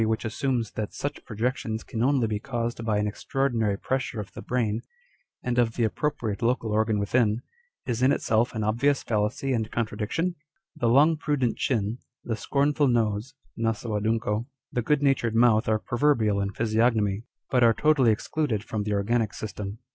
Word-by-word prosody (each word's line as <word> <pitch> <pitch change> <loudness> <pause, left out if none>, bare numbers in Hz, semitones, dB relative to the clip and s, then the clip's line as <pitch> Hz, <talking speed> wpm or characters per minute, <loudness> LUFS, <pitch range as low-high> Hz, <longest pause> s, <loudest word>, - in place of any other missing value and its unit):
191 110 0 +2
which 110 - -1
assumes 120 -1 -1
that 110 -2 -5
such 145 - -4
projections 115 0 -2
can 115 - -4
only 130 -1 +3
be 105 -2 -1
caused 120 -1 -3
by 110 -2 +1
an 105 - +1
extraordinary 115 -1 0
pressure 130 -2 -2
of 105 - -7
the - - -8
brain, 115 -3 -1 0.6
and 125 -1 0
of 115 -2 +2
the 120 - +2
ap 110 - -1
propriate 115 -9 -2
local 115 -2 +1
organ 110 0 +2
within, 110 +2 +1 0.4
is 120 -1 -2
in 130 +2 +5
itself 115 -3 +1
an 110 - -1
obvious 125 +7 +1
fallacy 115 +5 0
&nd 110 -1 -2
contradiction? 115 - -1 0.4
The 120 - 0
long 150 +6 +5
prudent 145 -6 0
chin, 115 -1 -1 0.2
the 115 - -2
scornful 145 +5 +1
nose 115 +1 0 0.2
(naso 115 0 -2
adunco), 110 +1 0 0.2
the 120 - 0
good 145 +4 +1
natured 125 -5 +2
mouth 115 -2 +4
are 110 - +3
proverbial 115 -4 +1
in 100 0 -1
physiognomy, 110 -1 +1 0.3
but 125 -2 +4
are 115 - +7
totally 140 -5 +4
excluded 110 0 -1
from 110 -2 -3
the 105 0 -1
organic 105 +2 0
system. 105 -1 -5
115 Hz, 175 wpm, -26 LUFS, 110-125 Hz, 0.6 s, are